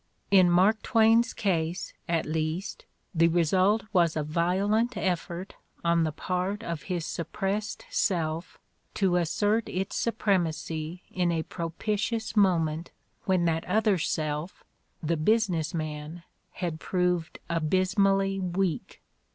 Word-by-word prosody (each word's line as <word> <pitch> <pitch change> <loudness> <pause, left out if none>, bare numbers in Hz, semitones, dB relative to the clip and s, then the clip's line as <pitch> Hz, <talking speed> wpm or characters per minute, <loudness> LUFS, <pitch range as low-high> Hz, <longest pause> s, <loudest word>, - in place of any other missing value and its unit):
In 185 -3 +6
Mark 190 +5 +4
Twain's 230 +1 +4
case, 175 -4 -1 0.2
at 165 -2 +1
least, 160 +4 -3 0.3
the 165 -1 +4
result 185 +6 +3
was 170 -4 +3
a 155 - 0
violent 190 +9 +1
effort 180 0 -2 0.3
on 170 -1 +3
the 155 - -1
part 185 +6 -2
of 170 -5 -4
his 175 -3 -1
suppressed 195 +6 -3
self 165 -3 -1 0.4
to 185 -3 +2
assert 205 +6 +1
its 190 +2 -3
supremacy 175 -6 -1
in 180 -2 +1
a 165 -1 0
propitious 215 +8 -3
moment 170 -5 +2 0.4
when 185 -2 +2
that 165 0 +1
other 205 0 +2
self, 155 +2 -2 0.4
the 165 +2 0
business 175 -3 +1
man, 155 +1 -5 0.3
had 170 -3 -3
proved 180 -2 -1
abysmally 195 +4 +2
weak. 180 -2 -2
180 Hz, 120 wpm, -28 LUFS, 165-195 Hz, 0.4 s, In